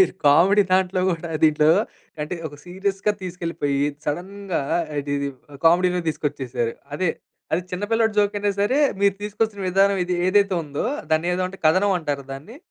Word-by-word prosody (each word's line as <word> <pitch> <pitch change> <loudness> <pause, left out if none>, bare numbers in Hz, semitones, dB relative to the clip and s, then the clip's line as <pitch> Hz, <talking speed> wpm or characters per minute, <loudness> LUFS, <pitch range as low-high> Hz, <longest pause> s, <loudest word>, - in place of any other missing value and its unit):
మీరు 380 - +4
కామెడీ 190 +8 +6
దాంట్లో 185 0 +2
కూడా, 170 0 -3 0.2
దీంట్లో 155 0 +4 0.5
అంటే 150 - -4
ఒక 145 - -13
సీరియస్‌గా 195 +3 -1
తీసుకెళ్ళిపోయి, 165 -6 -2 0.3
సడెన్‌గా 185 +4 -3 0.4
ఇది 145 0 -4
ఇది 140 0 -2 0.4
కామెడీలో 180 +2 +4
తీసుకొచ్చేసారు. 130 -6 -2 0.2
అదే 180 +2 0 0.5
అది 175 - 0
చిన్న 180 +3 -3
పిల్లాడి 225 -1 +3
జోకైనా 205 0 +2
సరే, 255 +8 +2 0.2
మీరు 200 -1 +4
తీసుకొచ్చిన 210 0 -2
విధానం 195 +2 +3
ఇది 180 0 -1
ఏదైతే 200 0 +3
ఉందో 145 +6 -3 0.3
దాన్ని 160 +3 +2
ఏదో 185 0 0
అంటే 195 +1 -11
కథనం 190 +5 +4
అంటార 145 -4 -3
దాన్ని? 155 - -11
180 Hz, 150 wpm, -23 LUFS, 155-200 Hz, 0.5 s, కామెడీ